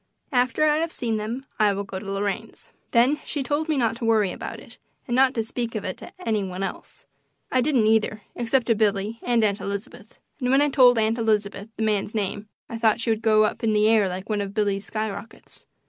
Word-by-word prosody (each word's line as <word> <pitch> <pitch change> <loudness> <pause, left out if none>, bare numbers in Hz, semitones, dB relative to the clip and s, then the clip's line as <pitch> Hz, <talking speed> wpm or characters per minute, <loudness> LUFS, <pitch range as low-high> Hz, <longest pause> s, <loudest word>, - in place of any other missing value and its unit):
After 255 +3 +2
I 300 0 +3
have 330 +1 -1
seen 230 -6 -1
them 230 +5 -4
I 210 -2 +4
will 200 +1 -3
go 190 -1 -6
to 195 0 -6
Lorraine's." 205 +3 -3 0.2
Then 255 +6 +3
she 290 -3 -3
told 300 +4 -1
me 305 - +1
not 230 -3 +1
to 235 - -8
worry 215 -4 +3
about - - -7
it, - - -14 0.3
and 240 - -2
not 260 0 +4
to 225 - 0
speak 230 0 -4
of 210 - -3
it 185 - -3
to - - -11
any 215 -3 +1
one 185 0 -4
else. 195 - -7 0.5
I 255 - +3
didn't, 255 -4 +2
either, 215 -1 +2
except 240 +1 +1
to 230 - +3
Billy 210 +1 0
and 240 -2 +2
Aunt 205 -1 +1
Elizabeth; 200 +3 -7 0.2
and 250 -2 -1
when 270 +2 +5
I 290 0 +3
told 250 -3 +6
Aunt 225 +1 +1
Elizabeth 210 -2 0
the 220 - -1
man's 215 0 0
name 205 0 -3 0.2
I 230 - -6
thought 225 0 +3
she 230 0 0
would 220 0 -1
go 215 -1 +4
up 215 - -1
into 220 -1 +2
the 210 0 +4
air 220 -3 +4
like 185 +1 -6
one 210 -2 -1
of 200 0 -5
Billy's 200 -2 0
skyrockets. 215 0 -6
220 Hz, 230 wpm, -24 LUFS, 205-245 Hz, 0.5 s, told